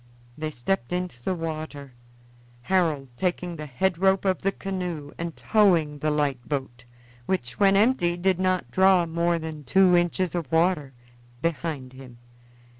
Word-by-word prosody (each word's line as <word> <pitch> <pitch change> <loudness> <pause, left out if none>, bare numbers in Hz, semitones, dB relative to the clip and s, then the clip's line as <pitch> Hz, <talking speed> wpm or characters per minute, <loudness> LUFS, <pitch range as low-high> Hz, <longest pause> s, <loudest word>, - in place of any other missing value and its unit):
They 155 +2 -3
stepped 145 +1 -2
into 180 -9 -3
the 185 +9 -1
water, 155 -4 -6 0.7
Harold 160 -7 +1
taking 180 -1 -2
the 155 -1 -7
head 170 +6 -1
rope 190 +1 +3
of 190 -2 +1
the 195 - +1
canoe 180 -7 -5
and 170 -1 -4
towing 170 -9 +3
the 155 - 0
light 145 -5 -1
boat 130 -4 -4 0.4
which, 125 -11 -2
when 195 -1 +5
empty, 200 -5 +3
did 185 0 +1
not 185 -1 0
draw 190 -2 +4
more 170 +1 0
than 160 -2 -6
two 185 +6 +4
inches 175 0 +1
of 165 -6 -4
water 160 -4 +1 0.5
behind 145 -4 -3
him. 130 -2 -12
170 Hz, 150 wpm, -25 LUFS, 145-185 Hz, 0.7 s, when